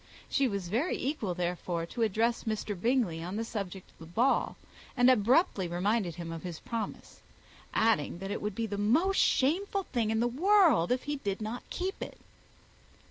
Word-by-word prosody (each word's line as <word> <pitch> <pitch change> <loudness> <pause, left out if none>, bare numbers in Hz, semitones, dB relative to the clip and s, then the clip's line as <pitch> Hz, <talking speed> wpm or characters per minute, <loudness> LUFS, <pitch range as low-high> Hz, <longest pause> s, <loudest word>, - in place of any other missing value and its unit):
She 275 -2 +3
was 200 -5 -3
very 240 - 0
equal, 240 - -2
therefore, 175 -1 -2
to 230 - -6
address 230 +3 +1
Mr. 215 -1 -2
Bingley 210 -5 +1
on 180 +4 -5
the 225 - -1
subject 195 -5 -6
of - - -29
the 165 - -10
ball, 235 +11 +1 0.4
and 245 +1 +6
abruptly 235 - +3
reminded 180 +1 0
him 170 -1 -6
of 165 -1 -6
his 175 -3 -6
promise; 230 -2 -6 0.5
adding, 215 -8 +2
that 195 +2 -5
it - - -3
would 210 -1 -3
be 230 - -1
the 205 -2 -4
most 320 - +2
shameful 385 +8 +2
thing 235 -9 -1
in 220 0 +1
the 240 - +2
world 325 - +4
if 250 0 +1
he 290 0 -2
did 200 -7 -3
not 220 +3 -4
keep 375 +2 -3
it. - - -6
220 Hz, 185 wpm, -30 LUFS, 185-255 Hz, 0.5 s, and